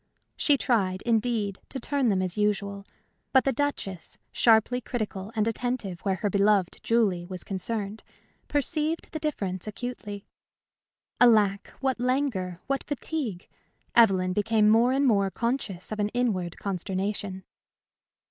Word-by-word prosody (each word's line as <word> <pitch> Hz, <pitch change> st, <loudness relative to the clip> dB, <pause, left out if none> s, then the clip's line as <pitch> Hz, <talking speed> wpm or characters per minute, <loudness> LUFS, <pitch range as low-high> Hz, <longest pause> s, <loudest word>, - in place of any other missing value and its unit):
She 290 Hz, -2 st, +3 dB
tried, 195 Hz, -8 st, 0 dB
indeed, 225 Hz, -4 st, 0 dB
to 265 Hz, -, -4 dB
turn 275 Hz, 0 st, +1 dB
them 190 Hz, -2 st, +1 dB
as 185 Hz, -1 st, -2 dB
usual; 200 Hz, -1 st, -1 dB, 0.5 s
but 265 Hz, -, +6 dB
the 270 Hz, -, +1 dB
Duchess, 225 Hz, -, -3 dB
sharply 230 Hz, +2 st, +4 dB
critical 215 Hz, -4 st, -4 dB
and 215 Hz, 0 st, +1 dB
attentive 230 Hz, -6 st, -2 dB
where 195 Hz, -2 st, 0 dB
her 205 Hz, +3 st, -1 dB
beloved 200 Hz, -2 st, +2 dB
Julie 200 Hz, -7 st, +1 dB
was 185 Hz, -1 st, -6 dB
concerned, 205 Hz, +2 st, -3 dB, 0.5 s
perceived 305 Hz, +3 st, 0 dB
the 315 Hz, -, -4 dB
difference 200 Hz, -, -3 dB
acutely! 210 Hz, -2 st, -6 dB, 0.9 s
Alack, 210 Hz, -5 st, +4 dB
what 265 Hz, -2 st, 0 dB
languor, 245 Hz, -9 st, -1 dB
what 275 Hz, 0 st, -1 dB
fatigue! 280 Hz, -, -4 dB, 0.5 s
Evelyn 190 Hz, -6 st, +5 dB
became 210 Hz, +1 st, +3 dB
more 230 Hz, +3 st, +5 dB
and 275 Hz, +2 st, +2 dB
more 200 Hz, -6 st, +3 dB
conscious 230 Hz, -5 st, -3 dB
of 215 Hz, -, -4 dB
an 205 Hz, 0 st, +1 dB
inward 190 Hz, -9 st, 0 dB
consternation. 190 Hz, 0 st, -3 dB
215 Hz, 130 wpm, -27 LUFS, 195-245 Hz, 0.9 s, but